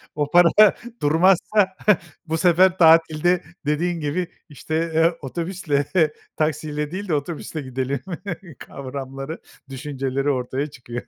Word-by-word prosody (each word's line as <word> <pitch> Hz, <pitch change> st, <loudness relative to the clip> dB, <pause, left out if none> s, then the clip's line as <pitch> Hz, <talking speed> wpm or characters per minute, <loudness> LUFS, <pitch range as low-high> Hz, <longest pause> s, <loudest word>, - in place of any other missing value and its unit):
O 145 Hz, -1 st, -2 dB
para 175 Hz, -1 st, +7 dB, 0.5 s
durmazsa 185 Hz, +6 st, +3 dB, 0.6 s
bu 160 Hz, +1 st, -1 dB
sefer 180 Hz, +1 st, +4 dB
tatilde 165 Hz, +1 st, +4 dB, 0.2 s
dediğin 165 Hz, +4 st, 0 dB
gibi, 160 Hz, +4 st, -2 dB, 0.2 s
işte, 155 Hz, +2 st, -4 dB, 0.2 s
eee, 165 Hz, +1 st, +3 dB
otobüsle, 160 Hz, 0 st, -2 dB, 0.5 s
taksiyle 150 Hz, -1 st, -2 dB
değil 200 Hz, +3 st, -5 dB
de 170 Hz, -, -1 dB
otobüsle 155 Hz, +1 st, -4 dB
gidelim 130 Hz, +1 st, -3 dB, 0.6 s
kavramları, 135 Hz, +2 st, -7 dB, 0.3 s
düşünceleri 135 Hz, 0 st, -3 dB
ortaya 130 Hz, +1 st, -1 dB
çıkıyor. 120 Hz, -4 st, -8 dB
150 Hz, 110 wpm, -22 LUFS, 140-170 Hz, 0.6 s, para